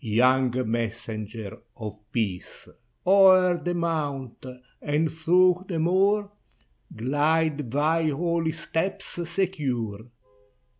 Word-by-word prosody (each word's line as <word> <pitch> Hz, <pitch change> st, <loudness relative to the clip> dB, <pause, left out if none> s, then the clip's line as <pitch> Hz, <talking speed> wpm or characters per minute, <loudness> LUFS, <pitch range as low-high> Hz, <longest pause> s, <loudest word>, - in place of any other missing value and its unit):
Young 125 Hz, +3 st, +2 dB
Messenger 110 Hz, -2 st, -4 dB, 0.2 s
of 105 Hz, -2 st, -7 dB
Peace! 100 Hz, -7 st, -4 dB, 0.4 s
O'er 185 Hz, -1 st, +6 dB
the 175 Hz, 0 st, -1 dB
mount, 145 Hz, -7 st, -3 dB, 0.4 s
and 150 Hz, +2 st, 0 dB
through 180 Hz, +3 st, +3 dB
the 175 Hz, -, -3 dB
moor, 195 Hz, +5 st, +2 dB, 0.6 s
Glide 145 Hz, +3 st, 0 dB
thy 155 Hz, +5 st, +1 dB
holy 165 Hz, +2 st, -1 dB
steps 175 Hz, +4 st, -4 dB
secure. 140 Hz, -, -2 dB
155 Hz, 90 wpm, -25 LUFS, 120-175 Hz, 0.6 s, O'er